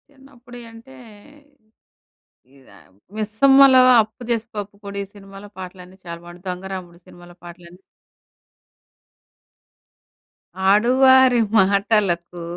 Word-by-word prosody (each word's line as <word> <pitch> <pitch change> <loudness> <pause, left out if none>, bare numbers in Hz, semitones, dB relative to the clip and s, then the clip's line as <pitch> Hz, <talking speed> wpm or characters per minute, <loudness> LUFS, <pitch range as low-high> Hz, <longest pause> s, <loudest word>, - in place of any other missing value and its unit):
చిన్నప్పుడియంటే, 245 -2 -16 1.6
ఇదా 135 - -21 0.4
'మిస్సమ్మలో,' 260 +5 +4 0.2
'అప్పు 220 +3 -14
జేసి 230 -1 -2
పప్పు 205 0 -8
కూడు' 200 0 -7
ఈ - - -6
సినిమాలో 195 0 -14
పాటలన్నీ 185 0 -11
చాలా 170 0 -8
బావుంటాయి. 175 +1 -15
'దొంగరాముడు' 180 -1 -8
సినిమాలో 175 0 -17
పాటలని 175 +1 -14 2.9
ఆడువారి 255 +3 +4
మాటలకూ 195 -4 0
200 Hz, 80 wpm, -20 LUFS, 180-240 Hz, 2.9 s, మిస్సమ్మలో